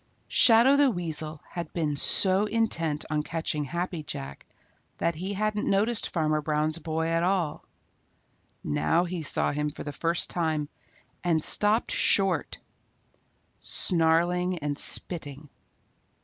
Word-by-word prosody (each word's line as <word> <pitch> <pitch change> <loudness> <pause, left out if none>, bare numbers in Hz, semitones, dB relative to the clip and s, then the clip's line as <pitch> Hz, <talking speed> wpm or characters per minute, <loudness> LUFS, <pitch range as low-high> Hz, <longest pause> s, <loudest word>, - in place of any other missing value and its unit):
Shadow 245 +4 +6
the 285 -1 +4
Weasel 160 - -3
had 170 -3 -7
been 155 -4 -2
so 190 +7 +6
intent 165 -9 -1
on 150 -1 0
catching 155 -1 -3
Happy 175 +3 -4
Jack 70 - -8 0.5
that 170 - -1
he 185 +5 -5
hadn't 210 +1 -2
noticed 215 +4 0
Farmer 155 -2 -1
Brown's 155 +2 -2
boy 160 0 -3
at 165 0 0
all. 175 -3 -1 1.0
Now 75 - 0
he 180 -1 -5
saw 155 - +1
him 150 +1 -2
for 150 - -9
the 145 - -7
first 165 +4 -1
time 155 -4 -2 0.5
and 165 -3 0
stopped 210 +3 +1
short, 195 -2 +1 1.0
snarling 175 +1 +1
and 145 -2 -4
spitting. 150 -2 -1
165 Hz, 125 wpm, -26 LUFS, 150-185 Hz, 1.0 s, Shadow